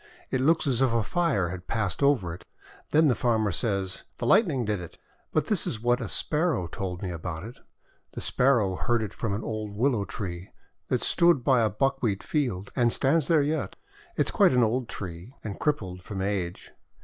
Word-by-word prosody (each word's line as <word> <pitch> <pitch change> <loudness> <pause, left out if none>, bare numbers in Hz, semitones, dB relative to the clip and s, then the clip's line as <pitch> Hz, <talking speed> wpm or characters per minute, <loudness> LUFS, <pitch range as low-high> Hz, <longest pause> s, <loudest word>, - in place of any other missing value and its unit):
It 130 - +1
looks 160 +5 +3
as 130 -3 +1
if 130 -3 +3
a 115 -1 +1
fire 160 - +1
had 90 0 -7
passed 105 -3 -2
over 125 -12 +2
it. 85 - -10 0.5
Then 155 +1 +4
the 130 - +4
farmer 110 -3 +1
says, 95 -1 -1 0.2
"The - - -3
Light 210 - +5
ning 135 -7 -1
did 105 -2 -1
it!' 85 - -10 0.3
But - - +1
this - - 0
is 110 - -3
what 120 +2 +1
a 115 - -4
Sparrow 155 - 0
told 90 +2 -5
me 90 - -3
about 85 0 -5
it. 120 +5 -10 0.5
The - - -6
Sparrow 120 -8 +2
heard 120 -2 +1
it 105 - -5
from 105 -3 -2
an 105 - -4
old 105 -2 -4
Willow 120 -4 +2
Tree 90 -4 -6 0.4
that - - 0
stood 170 -7 +4
by 130 -2 +4
a 110 - +3
buckwheat 115 -2 0
field, 120 - -2
and 120 -2 +3
stands 145 +4 +2
there 160 -4 +4
yet. 150 0 -2 0.4
It - - +3
is - - 0
quite - - +4
an 125 -1 +4
old 120 +2 0
tree, 95 +6 -7
and 105 -3 -6
crippled 95 -12 -1
from 95 0 -5
age. 95 -3 -3
115 Hz, 205 wpm, -27 LUFS, 95-135 Hz, 0.5 s, Light